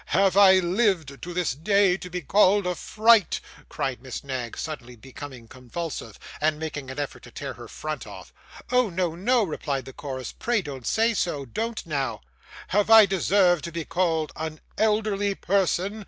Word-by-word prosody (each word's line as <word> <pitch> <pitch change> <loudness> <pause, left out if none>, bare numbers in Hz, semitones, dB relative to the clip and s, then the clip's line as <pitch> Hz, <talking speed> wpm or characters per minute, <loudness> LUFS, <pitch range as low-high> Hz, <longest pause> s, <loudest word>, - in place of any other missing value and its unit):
'Have 190 +3 +3
I 200 -1 +8
lived 180 -6 0
to 175 - -6
this 175 -1 0
day 195 +5 +3
to 180 -1 -8
be 180 0 -4
called 200 +4 +4
a 180 - 0
fright!' 215 +2 +3 0.3
cried 130 -3 -3
Miss 130 -2 -7
Knag, 130 -4 -5
suddenly 125 -6 -6
becoming 130 0 -10
convulsive, 125 -1 -6 0.2
and 155 0 +2
making 145 -4 -5
an 130 - -7
effort 145 -1 -4
to - - -13
tear - - -6
her - - -11
front - - -6
off. - - -11 0.4
'Oh 250 -3 +3
no, 175 -2 -1
no,' 230 +7 +2
replied 145 -6 -3
the 130 - -10
chorus, 130 -2 -6
'pray 235 -4 -1
don't 135 -5 -7
say 225 +1 +2
so; 155 -9 -1
don't 225 - -4
now!' 135 -8 -2 0.5
'Have 205 +2 +2
I 225 -1 +9
deserved 185 -2 +3
to 170 - -5
be 165 -1 -4
called 165 -4 0
an 155 -1 -5 0.2
elderly 210 -2 +1
person? 195 +2 0
175 Hz, 175 wpm, -25 LUFS, 140-200 Hz, 0.5 s, I